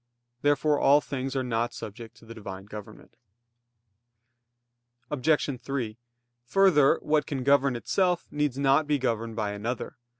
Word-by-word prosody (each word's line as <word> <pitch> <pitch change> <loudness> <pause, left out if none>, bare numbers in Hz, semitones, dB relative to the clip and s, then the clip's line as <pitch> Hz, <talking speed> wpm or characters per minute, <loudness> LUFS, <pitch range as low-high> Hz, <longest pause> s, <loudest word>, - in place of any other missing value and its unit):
Therefore 145 +1 +2
all 145 +2 +6
things 135 -2 -4
are 130 - 0
not 120 -1 -1
subject 110 +2 -9
to - - -17
the 115 - -9
Divine 100 -3 -8
government. 105 +2 -11 2.0
Obj. 145 -1 +1
3: 125 -4 -4 0.5
Further, 150 -2 +5
what 150 -1 +1
can 135 -4 -3
govern 140 -1 +3
itself 180 +8 0
needs 145 -3 -1
not 140 0 +4
to 155 - -5
be 145 0 +1
governed 115 -3 -2
by 105 -2 -1
another. 110 +4 -4
130 Hz, 140 wpm, -27 LUFS, 115-145 Hz, 2.0 s, all